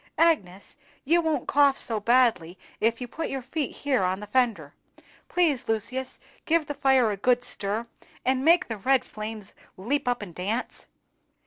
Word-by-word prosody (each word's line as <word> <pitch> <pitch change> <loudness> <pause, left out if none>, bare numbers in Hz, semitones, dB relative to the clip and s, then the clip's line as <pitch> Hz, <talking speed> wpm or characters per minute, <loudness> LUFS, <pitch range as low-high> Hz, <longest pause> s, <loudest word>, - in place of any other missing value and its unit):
Agnes, 285 - +1 0.3
you 335 +5 +3
won't 320 -2 -1
cough 285 -1 +4
so 225 -2 +1
badly 220 -7 +2 0.2
if 230 +1 +1
you 250 - -5
put 320 +7 -5
your 270 -2 -4
feet 295 +2 -3
here 275 -5 -1
on 185 +1 0
the 210 - -7
fender; 240 0 0 0.6
please, 325 -8 +1
Lucius, 230 +4 -3 0.3
give 330 -1 +2
the 290 - -4
fire 265 -5 +3
a 200 - -4
good 245 +4 +2
stir, 210 +1 -3 0.4
and 260 0 +1
make 340 +4 +4
the 225 - -4
red 255 +5 +2
flames 215 -1 -8 0.2
leap 250 +9 -2
up 245 -3 0
and 180 -4 -10
dance. 205 +8 -4
245 Hz, 165 wpm, -26 LUFS, 215-280 Hz, 0.6 s, cough